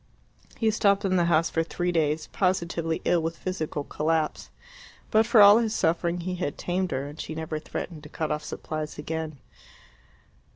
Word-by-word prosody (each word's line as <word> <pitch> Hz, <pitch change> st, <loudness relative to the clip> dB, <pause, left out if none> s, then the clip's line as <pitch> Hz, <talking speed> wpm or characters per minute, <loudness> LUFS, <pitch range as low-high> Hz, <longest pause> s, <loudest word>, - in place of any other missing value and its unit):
He 225 Hz, -1 st, +2 dB
stopped 200 Hz, -1 st, +2 dB
in 185 Hz, -1 st, +2 dB
the 175 Hz, -2 st, +3 dB
house 165 Hz, -1 st, +2 dB
for 165 Hz, -, +1 dB
three 175 Hz, +2 st, -2 dB
days, 155 Hz, -2 st, +1 dB
positively 170 Hz, -3 st, 0 dB
ill 175 Hz, -1 st, +3 dB
with 165 Hz, +1 st, -3 dB
physical 160 Hz, -5 st, -3 dB
collapse. 155 Hz, +1 st, -1 dB, 0.6 s
But 220 Hz, +1 st, +4 dB
for 225 Hz, -2 st, +6 dB
all 205 Hz, +2 st, +9 dB
his 225 Hz, -2 st, -1 dB
suffering 170 Hz, +1 st, +1 dB
he 180 Hz, +1 st, -3 dB
had 170 Hz, -5 st, -3 dB
tamed 180 Hz, +1 st, -1 dB
her, 135 Hz, -2 st, -2 dB
and 145 Hz, +2 st, -7 dB
she 160 Hz, -, -6 dB
never 160 Hz, -1 st, -3 dB
threatened 155 Hz, +1 st, -6 dB
to 150 Hz, -, -12 dB
cut 155 Hz, 0 st, -3 dB
off 150 Hz, 0 st, -2 dB
supplies 155 Hz, -1 st, -5 dB
again. 155 Hz, 0 st, -4 dB
165 Hz, 175 wpm, -26 LUFS, 155-185 Hz, 0.6 s, all